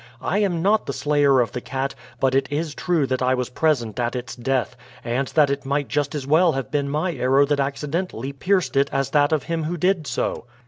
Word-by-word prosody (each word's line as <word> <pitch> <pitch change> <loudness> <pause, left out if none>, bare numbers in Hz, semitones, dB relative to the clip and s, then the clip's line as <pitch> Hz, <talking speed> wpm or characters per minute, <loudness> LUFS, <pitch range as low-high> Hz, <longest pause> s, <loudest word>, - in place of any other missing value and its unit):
I 200 - -1
am 180 -5 0
not 210 +3 +2
the 140 - -2
slayer 140 0 +3
of 120 - -1
the 125 - -5
cat, 135 +2 -3 0.3
but 130 -1 +2
it 135 +1 +1
is 150 +1 -2
true 170 -4 0
that 130 0 -2
I 130 0 +2
was 125 0 -3
present 125 -8 0
at 120 +1 -1
its 125 0 -5
death, 125 0 -1 0.3
and 125 +3 -1
that 150 -1 +3
it 140 0 -2
might 140 0 -1
just 145 0 -1
as 140 -3 -3
well 160 +4 +4
have 135 0 -4
been 140 -1 0
my 155 +5 -1
arrow 135 +1 +3
that 145 0 0
accidentally 140 -1 -3
pierced 175 -2 0
it 140 +1 +3
as 135 -1 -1
that 145 0 +3
of 155 -4 +1
him 165 -1 -2
who 175 +3 -3
did 180 -2 +1
so." - - -2
140 Hz, 230 wpm, -22 LUFS, 130-155 Hz, 0.3 s, well